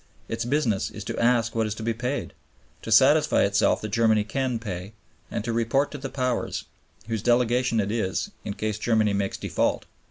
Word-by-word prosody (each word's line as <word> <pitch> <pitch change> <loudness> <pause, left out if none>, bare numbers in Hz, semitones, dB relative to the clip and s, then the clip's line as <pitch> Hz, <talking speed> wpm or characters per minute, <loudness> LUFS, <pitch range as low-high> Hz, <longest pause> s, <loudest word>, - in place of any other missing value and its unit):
Its 115 - -3
business 120 -7 0
is - - -8
to - - -4
ask 115 -1 +2
what 115 -1 0
is 105 - -3
to 110 - -7
be 115 +1 0
paid; 125 +5 -3 0.5
to - - -6
satisfy - - +5
itself - - +2
that 110 - -4
Germany 110 0 +3
can 125 +2 -1
pay; 100 -2 -6 0.4
and 115 - -3
to 115 0 -2
report 115 +5 +1
to 145 - -6
the 135 0 -5
Powers, 125 -3 -2 0.4
whose 110 -2 -2
delegation 120 0 +2
it 100 -1 0
is, 110 -5 -1
in 100 - -4
case 110 -1 -2
Germany 110 -2 +2
makes 100 -1 -1
default. - - -1
115 Hz, 190 wpm, -25 LUFS, 110-125 Hz, 0.5 s, satisfy